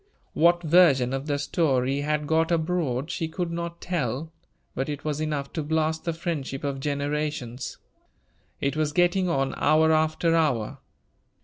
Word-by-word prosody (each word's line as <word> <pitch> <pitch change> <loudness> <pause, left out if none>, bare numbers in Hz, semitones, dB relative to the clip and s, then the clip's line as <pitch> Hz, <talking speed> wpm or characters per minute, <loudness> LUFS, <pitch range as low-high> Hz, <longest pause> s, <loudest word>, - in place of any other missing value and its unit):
What 175 +2 +4
version 150 -7 +5
of 135 +2 -3
the 145 -1 0
story 140 -2 +1
had 150 0 -1
got 160 +2 +2
abroad, 160 -4 0
she 165 - -2
could 170 +1 -3
not 170 0 -4
tell; 155 -2 -2 0.4
but 135 +3 -2
it 145 0 -5
was 150 0 -1
enough 150 -3 -3
to 160 - -2
blast 160 +1 -1
the 170 - +1
friendship 155 -5 -4
of 140 -1 -2
generations. 145 -3 -3 0.8
It 140 +2 -1
was 155 -1 0
getting 175 +2 +2
on, 135 -4 0
hour 160 +1 +4
after 160 +1 +2
hour. 125 -10 0
155 Hz, 150 wpm, -26 LUFS, 140-165 Hz, 0.8 s, version